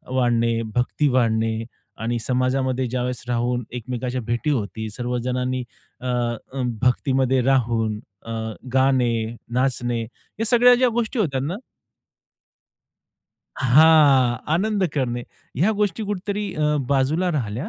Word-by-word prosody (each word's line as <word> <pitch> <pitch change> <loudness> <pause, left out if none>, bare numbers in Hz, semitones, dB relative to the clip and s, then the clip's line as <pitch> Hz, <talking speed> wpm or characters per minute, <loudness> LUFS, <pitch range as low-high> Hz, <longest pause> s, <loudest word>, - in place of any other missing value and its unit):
वाढणे, 115 -2 +2
भक्ती 125 +4 +1
वाढणे 115 -2 +1 0.4
आणि 120 +1 0
समाजामध्ये 130 +1 0
ज्यावेळेस 125 -1 -3
राहून 120 0 0
एकमेकांच्या 125 +1 -3
भेटी 120 +6 -2
होतील, 110 -3 -2
सर्व 125 0 -2
जणांनी 125 0 -1 0.4
अ, 130 - -5 0.7
भक्तीमध्ये 130 +1 +2
राहून 115 -5 +1 0.3
अ, 115 - -6 0.4
गाणे, 130 -3 +3 0.4
नाचणे 120 -2 0
या 205 - -8
सगळ्या 245 +2 +6
ज्या 250 0 +3
गोष्टी 235 +1 -2
होत्या 135 -10 0
ना 160 +7 -2 2.0
हां. 135 -2 +5 0.2
आनंद 205 +1 +1
करणे. 120 -3 -1 0.3
ह्या 185 +10 +3
गोष्टी 210 +1 0
कुठेतरी 205 0 -3
अ, 150 -1 +1
बाजूला 145 +7 +1
राहिल्या. 125 - -3
130 Hz, 110 wpm, -22 LUFS, 120-150 Hz, 2.0 s, सगळ्या